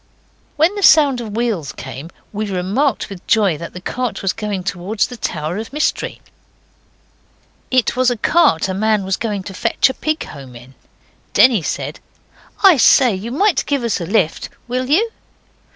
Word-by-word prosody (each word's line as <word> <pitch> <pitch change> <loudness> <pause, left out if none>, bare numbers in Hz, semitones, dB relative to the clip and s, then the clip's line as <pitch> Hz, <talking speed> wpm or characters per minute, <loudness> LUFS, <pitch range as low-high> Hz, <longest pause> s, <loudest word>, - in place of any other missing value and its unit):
When 320 +6 +3
the 410 - -5
sound 285 -8 +5
of 215 -3 -7
wheels 220 - -1
came 130 +5 -8 0.2
we 210 0 -3
remarked 205 +9 0
with 195 -3 -11
joy 205 -7 +3
that 170 - -8
the 180 - -7
cart 235 +2 -4
was 195 - +1
going 210 -4 -4
towards 195 +3 -1
the 250 - -8
Tower 160 -5 -3
of 220 +3 -6
Mystery. 300 +2 -2 1.5
It 255 -2 +1
was 255 0 +3
a 245 - -2
cart 215 - +3
a 190 - -3
man 215 0 +1
was 190 0 0
going 205 -3 -3
to 195 - -8
fetch 230 +6 +1
a - - -9
pig 310 +3 -2
home 135 -4 -11
in. 125 +3 -13 0.6
Denny 240 -7 +5
said - - -4 0.6
'I 380 -6 +7
say, 250 -1 +5
you 195 +5 -5
might 355 +3 +2
give 280 -4 0
us 230 -5 -1
a 170 - -4
lift. 190 -5 0 0.2
Will 255 +1 -2
you? 430 +10 +2
215 Hz, 175 wpm, -18 LUFS, 185-255 Hz, 1.5 s, I